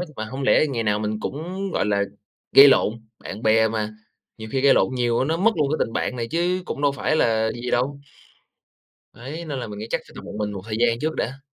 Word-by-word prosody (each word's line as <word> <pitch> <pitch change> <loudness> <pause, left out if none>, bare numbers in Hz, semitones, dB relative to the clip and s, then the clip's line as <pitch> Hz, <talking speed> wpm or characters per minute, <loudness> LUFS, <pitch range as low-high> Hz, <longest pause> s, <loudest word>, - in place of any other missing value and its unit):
hết, 180 - -3
mà 110 - -3
hông 130 +5 -6
lẽ 135 - +4
ngày 125 -6 -2
nào 105 -1 +1
mình 105 0 -3
cũng, 180 - -4
gọi - - 0
là, 100 -1 +1 0.5
gây 140 +1 +10
lộn, 110 - +4 0.3
bạn 105 +4 -8
bè 110 0 +4
mà, 110 -1 -3 0.4
nhiều 110 0 -7
khi 135 - +1
gây 135 0 +5
lộn 130 - +2
nhiều 120 -2 +1
á, - - +2
nó 160 +3 0
mất 205 +6 +4
luôn 150 -3 +1
cái 155 - +1
tình 115 - -10
bạn 125 - -2
này 115 -1 -3
chứ 175 +2 0
cũng 145 - -5
đâu 145 -1 +3
phải 150 +2 0
là 110 -5 +2
gì 120 +1 -5
đâu. 140 +3 0 1.1
Đấy, 150 +8 -7
nên 145 -4 -4
là 120 - -5
mình 105 -1 -8
nghĩ 110 - -6
chắc - - -1
phải - - -16
tập - - -8
một - - -9
mình 105 -1 -2
một 100 -2 -6
thời 110 -1 -3
gian 115 0 +2
trước 155 +1 -2
đã. 135 +2 -3
125 Hz, 260 wpm, -23 LUFS, 110-145 Hz, 1.1 s, gây